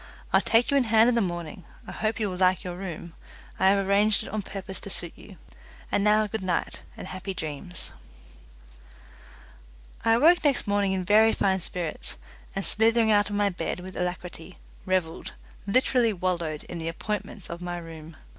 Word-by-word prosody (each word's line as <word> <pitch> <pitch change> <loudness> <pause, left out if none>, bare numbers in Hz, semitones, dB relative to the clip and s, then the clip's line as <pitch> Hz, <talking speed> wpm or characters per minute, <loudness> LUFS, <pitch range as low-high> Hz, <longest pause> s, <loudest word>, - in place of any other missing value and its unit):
I'll - - +6
take 230 +3 +3
you 280 - +4
in 265 - +3
hand 225 +1 +5
in - - +2
the 235 - +2
morning. 175 -2 -4 0.2
I - - -8
hope 220 +1 -2
you 215 - 0
will 185 - -4
like 185 0 +3
your 180 -1 -5
room; 175 -2 -7 0.5
I 190 - +5
have 195 0 +3
arranged 205 +2 +3
it - - -8
on 215 0 -2
purpose 195 -1 -6
to - - -8
suit - - +2
you. - - -14 0.5
And 200 - +2
now 215 +1 +4
good 215 +1 -4
night, 180 -2 -1 0.2
and - - -7
happy 185 +1 -6
dreams." 160 +3 -5 2.1
I 225 - +4
awoke 325 +9 +5
next 285 -4 +2
morning 200 -2 +1
in 185 -1 -2
very 220 +3 +5
fine 190 -1 +1
spirits, 175 -2 -2 0.4
and 195 - -2
slithering 225 0 +3
out 205 -1 +3
of 205 - -3
my 205 0 +2
bed 180 -1 -3
with 185 +1 -9
alacrity, 180 0 -5 0.3
revelled 180 -3 -1 0.3
literally 240 +1 +3
wallowed 170 -5 -2
in 175 - -7
the 165 - -4
appointments 205 +2 -5
of 170 +1 -7
my 175 0 -4
room. 160 -2 -10
190 Hz, 185 wpm, -26 LUFS, 175-215 Hz, 2.1 s, I'll